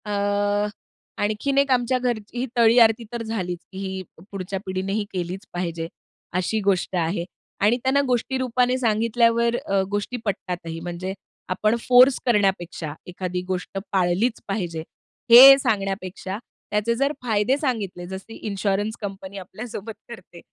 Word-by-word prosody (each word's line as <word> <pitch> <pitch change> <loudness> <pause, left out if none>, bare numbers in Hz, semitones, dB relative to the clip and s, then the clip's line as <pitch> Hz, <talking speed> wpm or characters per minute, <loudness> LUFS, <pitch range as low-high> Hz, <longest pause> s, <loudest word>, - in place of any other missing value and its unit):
अ, 205 0 0 0.5
आणखीन 215 +7 0
एक 280 -1 +3
आमच्या 255 0 +2
घरची 240 -2 -3
ही 250 - 0
तळी 230 0 +5
आरती 225 0 +5
तर 235 -1 -3
झालीच, 185 -6 -3
की 190 - -10
ही 190 -1 -4 0.3
पुढच्या 195 0 -4
पिढीनेही 190 +3 -2
केलीच 185 +3 -4
पाहिजे, 170 -2 -3 0.5
अशी 220 +4 0
गोष्ट 190 -1 +1
आहे 170 0 0 0.4
आणि 215 +4 +4
त्यांना 265 +2 +3
गोष्टीरूपाने 250 0 +1
सांगितल्यावर 230 0 +2
अ, 195 0 +2
गोष्टी 205 +4 -2
पटतातही. 175 -5 -4
म्हणजे 175 +2 -5 0.4
आपण 215 +4 +1
फोर्स 250 +1 +7
करण्यापेक्षा 190 - 0
एखादी 180 0 -4
गोष्ट 185 +1 -4
पाळलीच 190 +5 +1
पाहिजे, 175 -5 -3 0.5
हे 270 +3 +12
सांगण्यापेक्षा 195 -5 -2 0.3
त्याचे 210 +3 +1
जर 275 +4 +1
फायदे 225 +3 +2
सांगितले, 215 - -3
जसं 190 +4 -8
इन्शुरन्स 205 +1 -2
कंपनी 195 -1 -6
आपल्यासोबत 215 +3 -7 0.2
करते, 185 -6 -11
205 Hz, 130 wpm, -23 LUFS, 185-235 Hz, 0.5 s, हे